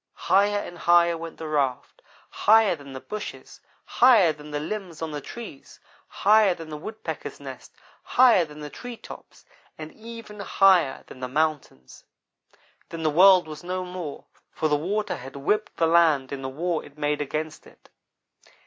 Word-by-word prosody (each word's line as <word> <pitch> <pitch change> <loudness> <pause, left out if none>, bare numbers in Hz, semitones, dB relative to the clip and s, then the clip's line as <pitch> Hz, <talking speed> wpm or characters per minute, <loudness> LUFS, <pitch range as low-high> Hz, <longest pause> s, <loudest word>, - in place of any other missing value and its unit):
"Higher 205 +1 +4
and 175 -4 -6
higher 170 0 +4
went 165 0 -8
the 160 - -6
raft; 140 -5 -2 0.3
higher 220 -3 +4
than 140 -3 -13
the 130 - -6
bushes; 210 +9 -8 0.2
higher 225 -10 +5
than 150 0 -13
the 145 0 -3
limbs 180 0 -6
on 160 -1 -4
the 145 -1 -5
trees; 215 - -10 0.3
higher 210 -2 +3
than 165 -2 -10
the 150 - -6
Woodpecker's 215 +8 -7
nest; - - -10 0.3
higher 245 -8 +5
than 150 -1 -10
the 150 -1 -7
tree 245 -1 -8
tops, - - -13 0.3
and 155 0 -8
even 225 -2 -11
higher 190 -7 +3
than - - -13
the 130 - -4
mountains. 145 - -3 0.9
Then 165 -1 -6
the 155 - +2
world 185 +1 +6
was 155 +2 -9
no 185 +1 -3
more, 180 -5 -7 0.3
for 155 - -1
the 150 - +2
water 200 +8 -2
had 130 +2 -10
whipped 210 +10 -1
the 165 - +3
land 160 -5 +3
in 140 -1 -5
the 130 - -4
war 165 +4 -2
it 145 +1 -16
made 150 0 -1
against 155 +2 -5
it. - - -21
165 Hz, 170 wpm, -25 LUFS, 150-195 Hz, 0.9 s, world